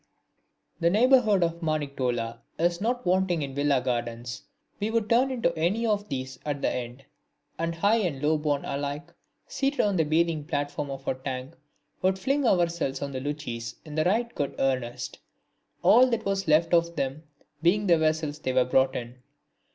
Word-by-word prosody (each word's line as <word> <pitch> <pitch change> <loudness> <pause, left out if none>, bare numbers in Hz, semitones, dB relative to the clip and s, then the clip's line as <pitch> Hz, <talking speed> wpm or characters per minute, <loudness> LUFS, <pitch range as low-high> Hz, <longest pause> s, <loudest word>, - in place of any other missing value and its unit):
The 170 - +3
neighbourhood 220 -2 +4
of 170 0 -2
Maniktola 130 -7 -2 0.2
is 175 +1 +1
not 245 +3 -1
wanting 180 -3 +2
in 135 -1 -5
Villa 140 -1 +2
gardens. 120 0 -3 0.4
We 210 +2 -1
would 225 -1 0
turn 245 +4 +3
into 230 -10 0
any 180 +9 0
one 220 - +3
of 205 0 -4
these 130 -2 -5
at 145 -2 -3
the - - +2
end, 125 +2 -6 0.5
and 165 0 -1
high 205 +7 +3
and 175 -11 -1
low 150 +2 +2
born 145 -2 -1
alike, 145 +1 -4 0.3
seated 285 - -2
on 205 -2 +1
the 160 - +4
bathing 160 0 +1
platform 145 -2 -3
of 135 0 -7
a - - +2
tank, 130 0 -6 0.5
would 190 0 +2
fling 270 +7 +1
ourselves 170 -7 +1
on 140 - -4
the 130 -1 -4
luchis 120 -5 -4
in 155 - -9
right 205 +10 +1
good 140 -2 -3
earnest, 130 -3 -2 0.6
all 250 +3 +7
that 230 -2 -1
was 195 -1 -1
left 160 +3 +3
of 170 0 +3
them 135 0 -2 0.4
being 195 +5 +3
the 170 -4 +4
vessels 155 -1 0
they 130 -4 -2
were 130 -1 +4
brought 130 +1 +2
in. 120 +1 -6
155 Hz, 175 wpm, -27 LUFS, 135-190 Hz, 0.6 s, all